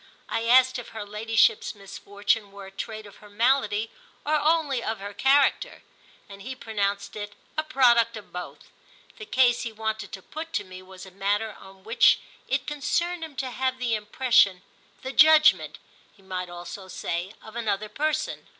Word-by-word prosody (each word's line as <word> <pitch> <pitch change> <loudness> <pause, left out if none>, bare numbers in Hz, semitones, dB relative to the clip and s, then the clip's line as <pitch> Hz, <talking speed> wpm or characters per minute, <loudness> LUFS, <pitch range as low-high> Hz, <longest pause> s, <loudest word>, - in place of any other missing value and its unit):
I 225 0 -2
asked 255 +1 +5
if 240 - -9
her 210 - -5
ladyship's 225 - +1
misfortune 200 +1 -2
were 200 0 -10
a 190 - -11
trait 215 +2 -6
of 205 - -14
her 210 - -16
malady 225 -1 +1 0.3
or 300 - 0
only 305 -4 +2
of 225 -1 -3
her 200 +1 -7
character, 270 +5 +2 0.4
and 200 -1 -12
he 260 +5 -6
pronounced 200 -4 -2
it 205 -1 -7 0.2
a 310 - +1
product 240 -6 +3
of 210 - -13
both. 180 0 -8 0.5
The 435 - -9
case 245 -2 +3
he 235 - -4
wanted 220 -1 -4
to 190 -3 -8
put 325 +1 -8
to 205 - 0
me 185 -1 -11
was 185 0 -12
a 190 - -13
matter 205 +3 -1
on 190 0 -15
which 225 +4 +5 0.3
it - - -1
concerned 340 +4 -1
him 315 -3 -8
to 260 -1 -3
have 260 +1 -1
the 250 -2 -1
impression—the 220 +1 0
judgement, 310 +1 +6 0.3
he 195 - -25
might 185 -1 -5
also 175 +2 -8
say—of 185 +5 -5
another 215 -3 -1
person. 310 +7 -2
220 Hz, 170 wpm, -26 LUFS, 200-260 Hz, 0.5 s, judgement